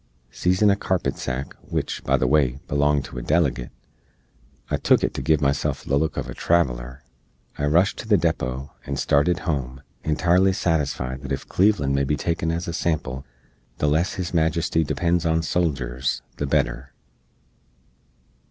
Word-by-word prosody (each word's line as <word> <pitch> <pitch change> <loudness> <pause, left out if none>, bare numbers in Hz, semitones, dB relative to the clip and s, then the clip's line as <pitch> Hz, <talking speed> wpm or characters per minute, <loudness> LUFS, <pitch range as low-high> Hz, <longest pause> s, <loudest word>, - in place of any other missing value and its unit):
Seezin 90 - +3
a - - +3
carpet 95 -3 -1
sack, 65 +1 -4
wich, - - -3
by - - +2
the - - 0
way, 65 -2 +3
belonged 70 0 +2
to 60 - -7
a - - -6
delegate 70 -5 +1 1.0
(I - - +2
took - - +3
it - - 0
to - - -4
give 80 +2 +2
myself 70 -1 0
the 70 - 0
look 75 0 0
of - - -2
a - - -6
traveler), 65 -6 0 0.5
I 75 - -1
rushed 85 +7 +3
to - - -7
the 105 -2 +5
depot, 70 -6 -2
and 70 -1 -4
startid 85 +7 +2
home, 65 -5 -3 0.2
entirely 90 +5 +3
satisfied 70 -8 -1
that 70 -1 -7
ef 70 - -3
Cleveland 95 -9 +2
may 70 0 +2
be 75 +2 0
taken 80 0 -1
as 85 +1 -2
a 85 - -3
sample, 75 -5 -2 0.5
the 75 - +1
less 80 +6 +1
His 90 -2 -4
Majesty 80 0 +1
depends 85 +3 0
on 80 -1 +2
soljers, 65 -7 -1 0.2
the 70 - -2
better. 65 -1 -1
75 Hz, 165 wpm, -23 LUFS, 65-85 Hz, 1.0 s, the